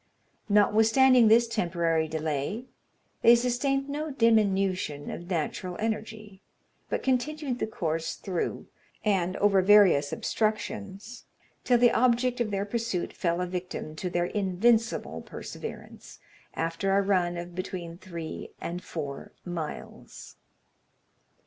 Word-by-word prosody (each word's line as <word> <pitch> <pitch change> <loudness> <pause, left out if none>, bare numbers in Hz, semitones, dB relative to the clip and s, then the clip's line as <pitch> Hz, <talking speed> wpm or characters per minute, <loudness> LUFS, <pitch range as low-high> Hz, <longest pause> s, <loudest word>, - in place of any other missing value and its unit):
Notwithstanding 225 +4 +5
this 235 +2 +5
temporary 170 -6 0
delay, 155 - -3 0.6
they 235 - +8
sustained 260 +3 0
no 300 +2 -3
diminution 195 - +1
of 175 +1 -8
natural 180 +1 -3
energy, 215 -2 -4 0.5
but - - -2
continued 265 0 -1
the - - -1
course 165 -6 -2
through 185 -3 -3 0.4
and 190 -3 +1
over 200 -2 +4
various 185 -8 +5
obstructions, 215 0 -3 0.4
till 245 - +4
the 240 0 +5
object 245 +1 +2
of 225 - 0
their 200 0 -1
pursuit 225 -4 -2
fell 170 -1 -1
a - - 0
victim 180 -3 -5
to 180 - -3
their 175 0 0
invincible 215 +5 +1
perseverance, - - -9 0.4
after 180 +4 0
a - - +4
run 180 -3 +1
of 175 +1 -7
between 175 -2 -6
three 170 -4 -7
and 175 +2 -5
four 145 -4 -6
miles. 165 - -7
195 Hz, 115 wpm, -28 LUFS, 175-230 Hz, 0.6 s, they